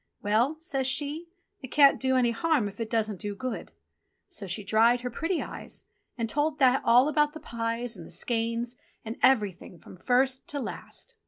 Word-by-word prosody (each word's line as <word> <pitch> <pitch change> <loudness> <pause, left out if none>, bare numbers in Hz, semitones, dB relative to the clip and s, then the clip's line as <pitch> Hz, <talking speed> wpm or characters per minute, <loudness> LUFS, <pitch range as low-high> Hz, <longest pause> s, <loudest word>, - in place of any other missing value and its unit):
"Well," 230 +9 +2
says 270 -6 -1
she, 295 +5 0 0.3
"it 260 - -7
can't 280 +1 +5
do 260 0 +1
any 240 -2 +3
harm 290 -2 +1
if 200 +2 -10
it 225 -1 -3
doesn't 215 -4 -1
do 205 -1 -4
good." 255 +4 -5 0.6
So 315 - -8
she 195 +4 -4
dried 230 +4 +3
her 250 0 -4
pretty 330 +8 -1
eyes - - -7 0.3
and 230 -2 -1
told 295 +4 0
That 260 -1 +4
all 245 +4 +5
about 300 0 +2
the 315 - -8
pies, 230 -1 -3
and 170 -4 -10
the - - -12
skeins, 230 +1 -2 0.3
and 225 +1 -5
everything 210 -9 +1
from - - -14
first 255 +6 +1
to 290 - -4
last. - - -8
245 Hz, 185 wpm, -28 LUFS, 225-280 Hz, 0.6 s, can't